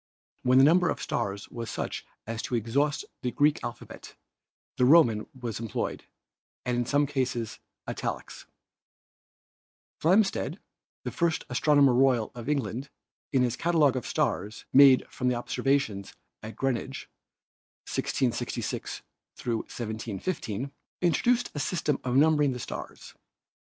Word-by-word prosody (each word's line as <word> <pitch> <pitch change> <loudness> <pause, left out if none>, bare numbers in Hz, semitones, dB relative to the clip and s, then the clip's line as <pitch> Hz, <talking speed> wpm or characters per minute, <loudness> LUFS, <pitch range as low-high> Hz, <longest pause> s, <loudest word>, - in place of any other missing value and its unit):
When 125 +1 +4
the 135 - +8
number 175 +4 +5
of - - -2
stars 100 0 -3
was 115 -1 -6
such - - -4 0.2
as 115 0 -4
to 125 - -3
exhaust 135 +6 0 0.2
the 125 - -1
Greek 145 +4 +2
alphabet 120 - -8 0.6
the 125 - +4
Roman 125 -7 +5
was 115 -4 -4
employed 115 -3 -3 0.6
and 125 - 0
in 120 -1 -1
some 145 +2 +3
cases 130 -5 -2 0.3
italics. - - -5 1.5
Flam 185 +7 +5
steed, 195 - -3 0.5
the - - -3
first 170 -2 0
Astronomer 140 0 +4
Royal 125 -3 +3
of 120 +2 -6
England, 135 -1 -2 0.4
in 130 -3 +3
his 120 -1 0
cata 170 +3 0
logue 145 -4 +5
of 130 - -3
stars 100 +5 -1
made 135 -1 +7
from 125 0 -1
observations 120 -4 -1 0.3
at 110 +1 -8
Greenwich 135 -4 -2 0.8
(1666 120 -1 -2 0.3
1715), 115 - -4 0.3
introduced 235 - +2
a 145 - -4
system 150 -2 0
of 125 -1 -1
numbering 150 -1 +4
the 125 - -6
stars. - - -7
130 Hz, 125 wpm, -28 LUFS, 115-145 Hz, 1.5 s, the